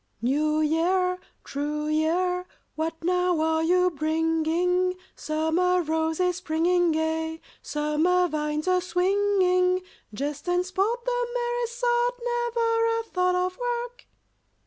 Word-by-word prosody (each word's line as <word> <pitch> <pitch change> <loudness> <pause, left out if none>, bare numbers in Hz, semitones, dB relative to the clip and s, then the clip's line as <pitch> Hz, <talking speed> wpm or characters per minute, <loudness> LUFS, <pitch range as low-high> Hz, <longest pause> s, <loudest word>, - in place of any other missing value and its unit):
"New 305 +6 +1
Year, 365 +4 +1 0.2
true 295 +2 -3
year, 355 +4 0 0.3
What 325 +1 -4
now 360 -1 +1
are 320 0 +1
you 360 +2 +3
bringing? 325 +3 +1 0.2
Summer 330 +4 0
roses 320 +3 0
springing 350 0 +1
gay, 320 0 -1 0.2
Summer 310 +5 +1
vines 305 0 -2
a 365 0 +3
swinging? 365 0 +2 0.3
Jest 290 - -4
and 355 0 +1
sport, 410 +6 -1
the - - 0
merriest 480 0 -2
sort, 485 0 +2
Never 470 -1 0
a - - -3
thought 365 -4 0
of 365 +2 -1
work?" 485 0 -4
360 Hz, 115 wpm, -26 LUFS, 320-370 Hz, 0.3 s, you